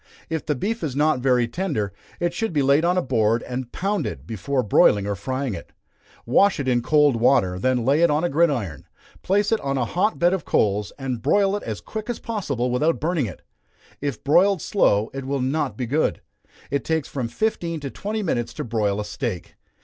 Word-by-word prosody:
If 160 -1 -3
the 150 - +1
beef 220 - -3
is 140 -5 -2
not 150 -1 +2
very 125 -2 +2
tender, 115 - -2 0.3
it 175 0 0
should 225 0 -2
be 145 -3 +2
laid 140 +3 +4
on 175 +2 +2
a 180 - +2
board 115 -2 +1
and 125 -1 -5
pounded, 195 - -2
before 125 - -2
broiling 100 -1 +4
or 100 - -1
frying 130 +5 -3
it. 85 - -9 0.5
Wash 195 +11 +3
it 135 - -2
in 120 -2 +2
cold 145 -1 +3
water, 115 -7 +3
then 125 +2 +1
lay 140 +5 +3
it 170 - +5
on 150 +2 +1
a - - +3
gridiron, 135 - 0 0.3
place 205 +3 +1
it 225 - +3
on 135 -1 -1
a 125 - +1
hot 185 - 0
bed 175 +1 +3
of 190 -5 -2
coals, 105 0 +1
and 130 -4 -4
broil 195 - +3
it 205 - -3
as 110 -2 -5
quick 220 +1 -6
as 240 - -2
possible 140 - -2
without 150 +7 +1
burning 160 -6 0
it. 90 - -10 0.6
If 140 -5 -3
broiled 185 +7 +4
slow, 110 - +2
it 135 -1 -5
will 140 +1 -1
not 135 +5 -1
be 130 - -2
good. 145 +7 0 0.5
It 140 0 0
takes 160 -3 -1
from 130 -4 -3
fifteen 170 - -2
to 140 -2 -5
twenty 215 +1 -3
minutes 120 -10 -2
to - - -4
broil 105 -3 0
a 105 - -3
steak. 90 -3 -4
140 Hz, 210 wpm, -23 LUFS, 120-170 Hz, 0.6 s, it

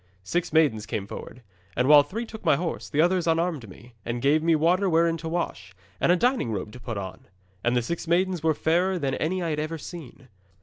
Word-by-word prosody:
'Six 170 - -2
maidens 140 -10 +2
came 100 - -3
forward, 120 +4 -9 0.3
and 125 - +1
while 150 0 +9
three 210 +12 -5
took 220 -1 -10
my - - +4
horse, 165 +3 -4
the 150 0 +2
others 175 0 +2
unarmed 165 - 0
me, 120 +6 -15
and 120 +1 -3
gave 145 +5 +3
me 165 0 +3
water 180 +5 +2
wherein 165 0 +3
to 160 0 -6
wash, 100 - -4 0.2
and - - +3
a - - +5
dining 245 - +1
robe 105 0 -4
to 125 - -11
put 115 -3 -5
on. 95 -1 -7 0.4
And 120 +1 +1
the 120 - +1
six 170 +5 -4
maidens 180 0 +1
were 160 -1 +2
fairer 180 +5 +1
than 140 -5 -1
any 180 +6 -1
I 165 - -1
had 150 - -2
ever 155 +2 -3
seen. 150 -4 -10
160 Hz, 225 wpm, -26 LUFS, 125-175 Hz, 0.4 s, while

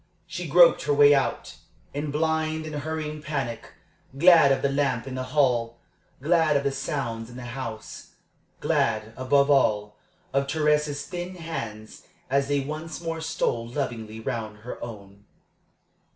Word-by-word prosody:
She - - -5
groped - - +6
her 145 - +2
way 145 0 +7
out, 135 -1 -1 0.4
in 145 +1 -3
blind 160 +1 0
and 155 - -6
hurrying 155 0 -4
panic 135 -7 -4 0.4
glad 170 -3 +7
of 135 - +1
the 140 - +2
lamp 135 -4 0
in 135 - -6
the 130 0 -3
hall, 120 -4 +2 0.5
glad 160 -2 +3
of 140 - -1
the 140 - +1
sounds 130 -5 -3
in 120 - -12
the 125 - -8
house, 120 -3 -7 0.5
glad, 110 0 0
above 140 +2 +3
all, 105 -6 +2 0.4
of 140 0 +1
Thérèse's 150 -1 +1
thin 180 +1 -6
hands 115 -11 -7 0.2
as 140 0 +2
they 145 0 +1
once 155 +3 -6
more 165 -1 -4
stole 160 -8 -1
lovingly 115 -4 -4
round 110 -1 -4
her 120 - -7
own. 100 -3 -10
140 Hz, 150 wpm, -26 LUFS, 115-155 Hz, 0.5 s, way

